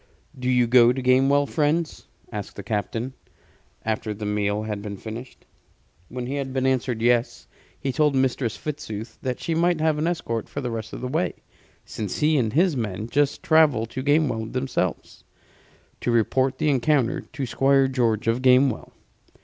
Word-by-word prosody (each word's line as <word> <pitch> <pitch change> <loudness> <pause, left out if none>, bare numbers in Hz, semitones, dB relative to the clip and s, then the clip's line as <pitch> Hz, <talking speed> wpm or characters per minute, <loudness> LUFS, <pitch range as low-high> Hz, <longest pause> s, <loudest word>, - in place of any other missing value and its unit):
"Do 125 -1 -3
you 125 -1 +4
go 120 0 +6
to 130 - -3
Gamewell, 135 +3 +3
friends?" 155 +2 -1 0.2
asked 105 -3 -6
the 100 - -7
captain, 115 +5 -3 0.7
after 110 -1 -2
the 105 +1 -6
meal 105 0 0
had 105 -2 -4
been 100 -1 -6
finished. 115 +5 -9 0.6
When 125 -1 -5
he 135 +3 -3
had 135 -1 -3
been 130 0 -1
answered 125 -3 0
yes, 120 0 +1 0.3
he 135 - -2
told 150 +2 +2
Mistress 130 -3 0
Fitzooth 125 -8 -6
that 125 -1 -3
she 165 - -2
might 170 0 +2
have 155 -1 +1
an 155 - 0
escort 115 -10 -2
for - - -5
the 125 -3 -3
rest 110 -1 -5
of - - -6
the 125 - -3
way; 160 +7 -1 0.5
since 105 -4 -5
he 155 +1 +2
and 110 -4 0
his 170 +2 +3
men 110 -2 -3
must 145 -1 +1
travel 155 -8 +4
to 130 +3 -6
Gamewell 140 -6 +1
themselves, 130 -9 -3 0.8
to - - -2
report 130 +3 +2
the 155 - +1
encounter 135 -1 +1
to 140 -4 -6
Squire 135 +2 +3
George 115 -5 0
of 115 +2 +1
Gamewell. 130 +1 +3
130 Hz, 175 wpm, -24 LUFS, 115-140 Hz, 0.8 s, go